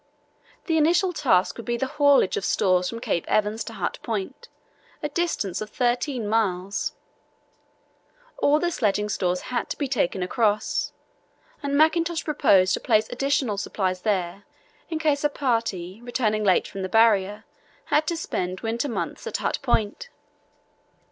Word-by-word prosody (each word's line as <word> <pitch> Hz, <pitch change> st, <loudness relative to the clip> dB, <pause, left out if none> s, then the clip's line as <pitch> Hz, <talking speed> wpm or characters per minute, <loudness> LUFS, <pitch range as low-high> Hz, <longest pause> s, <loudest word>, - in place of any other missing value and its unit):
The 325 Hz, -3 st, +2 dB
initial 350 Hz, +4 st, +3 dB
task 215 Hz, -, +2 dB
would 230 Hz, -, -8 dB
be 240 Hz, 0 st, 0 dB
the 265 Hz, -, -1 dB
haulage 285 Hz, -5 st, +3 dB
of -, -, -3 dB
stores 185 Hz, -2 st, +2 dB
from 230 Hz, -, -6 dB
Cape 220 Hz, -8 st, -1 dB
Evans 215 Hz, +1 st, +1 dB
to 225 Hz, -, -7 dB
Hut -, -, -3 dB
Point, 230 Hz, -, -4 dB, 0.6 s
a 295 Hz, -, -1 dB
distance 280 Hz, -, -1 dB
of 215 Hz, -, -5 dB
13 245 Hz, -1 st, -1 dB
miles. 200 Hz, -3 st, 0 dB, 1.5 s
All 290 Hz, +1 st, +4 dB
the 345 Hz, +2 st, 0 dB
sledging 210 Hz, -, 0 dB
stores 180 Hz, -3 st, 0 dB
had 240 Hz, -, -1 dB
to -, -, -4 dB
be 285 Hz, -, -1 dB
taken 195 Hz, -7 st, 0 dB
across, 210 Hz, +2 st, 0 dB, 0.7 s
and 280 Hz, -1 st, -1 dB
Mackintosh 330 Hz, +2 st, +2 dB
proposed 195 Hz, -, +4 dB
to -, -, 0 dB
place 215 Hz, -2 st, +2 dB
additional 265 Hz, -4 st, 0 dB
supplies 185 Hz, -3 st, -2 dB
there 195 Hz, -2 st, -1 dB, 0.4 s
in 325 Hz, -, -2 dB
case 300 Hz, -3 st, +1 dB
a 295 Hz, -, +3 dB
party, 225 Hz, -8 st, -2 dB
returning 225 Hz, -3 st, 0 dB
late 190 Hz, -3 st, +3 dB
from 195 Hz, -, -7 dB
the 190 Hz, -, -3 dB
Barrier, 210 Hz, -2 st, +3 dB, 0.4 s
had 305 Hz, +1 st, +1 dB
to 335 Hz, -, -1 dB
spend 185 Hz, -, -3 dB
winter 230 Hz, +5 st, -2 dB
months 235 Hz, -, -4 dB
at -, -, -2 dB
Hut -, -, -1 dB
Point. 240 Hz, -, -1 dB
225 Hz, 155 wpm, -24 LUFS, 195-285 Hz, 1.5 s, All